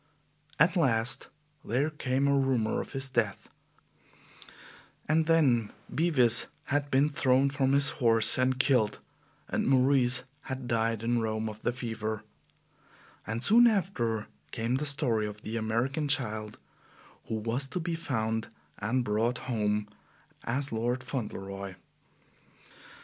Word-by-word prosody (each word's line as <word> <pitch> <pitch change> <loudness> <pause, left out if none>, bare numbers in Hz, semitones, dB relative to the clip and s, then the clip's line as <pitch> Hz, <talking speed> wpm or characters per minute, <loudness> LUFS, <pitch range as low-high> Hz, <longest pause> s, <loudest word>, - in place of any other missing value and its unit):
At 165 +6 +4
last 125 -6 +1 0.4
there 135 +8 0
came 135 -2 0
a 140 - +3
rumor 130 -5 +1
of - - -10
his 135 0 +1
death, 135 - -1 1.6
and 155 +1 +2
then 130 -10 +3 0.2
Bevis 130 -8 +3 0.3
had 145 0 0
been 140 +2 +3
thrown 135 -1 +2
from 135 -1 +1
his 140 0 +4
horse 115 -2 +5
and 130 0 +2
killed, 125 -7 +2 0.5
and - - -1
Maurice 130 -1 +3 0.3
had 130 -1 -4
died 115 -1 0
in 120 0 +1
Rome 110 0 -2
of 110 0 -8
the - - 0
fever; 110 -3 -4 1.0
and 110 +3 -2
soon 235 +3 +7
after 125 - 0 0.2
came 115 +3 -1
the 150 +2 -1
story 120 -7 +1
of 105 0 -9
the 110 - -5
American 115 +7 -1
child 110 -6 -1 0.7
who 110 - -2
was 115 +5 -1
to 180 - -4
be 170 0 -3
found 110 -8 -2 0.3
and 120 +5 0
brought 115 +3 0
home 105 -3 -1 0.6
as 135 +4 -2
Lord 120 +3 -1
Fauntleroy. 100 -6 -5
125 Hz, 130 wpm, -29 LUFS, 110-140 Hz, 1.6 s, soon